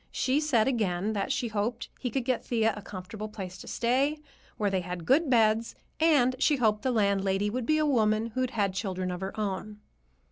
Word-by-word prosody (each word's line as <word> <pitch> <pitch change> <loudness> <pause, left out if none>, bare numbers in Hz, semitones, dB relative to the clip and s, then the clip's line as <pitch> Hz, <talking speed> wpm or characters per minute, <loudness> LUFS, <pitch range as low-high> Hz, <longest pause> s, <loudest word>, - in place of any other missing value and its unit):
She 265 +3 +1
said 265 -8 +2
again 210 -5 0
that 200 +3 -1
she 250 -4 -1
hoped 220 +2 -2
he 250 - -2
could 255 +1 -2
get 255 -2 0
Thea 225 -2 +1
a 210 - -7
comfortable 200 +2 -7
place 185 -4 -7
to - - -10
stay, 265 +6 +1 0.4
where 205 -2 0
they 190 -1 0
had 180 -1 -6
good 290 - +3
beds, 225 -2 +3 0.2
and 285 -6 +4
she 295 +1 +3
hoped 215 -5 +1
the 260 - 0
landlady 200 -2 +1
would 250 0 -3
be 310 - +3
a 310 - +2
woman 225 -4 +2
who'd 255 +2 -1
had 205 -6 0
children 185 -1 -3
of 180 0 -5
her 190 +3 -5
own. 210 +1 -3
220 Hz, 205 wpm, -28 LUFS, 200-255 Hz, 0.4 s, and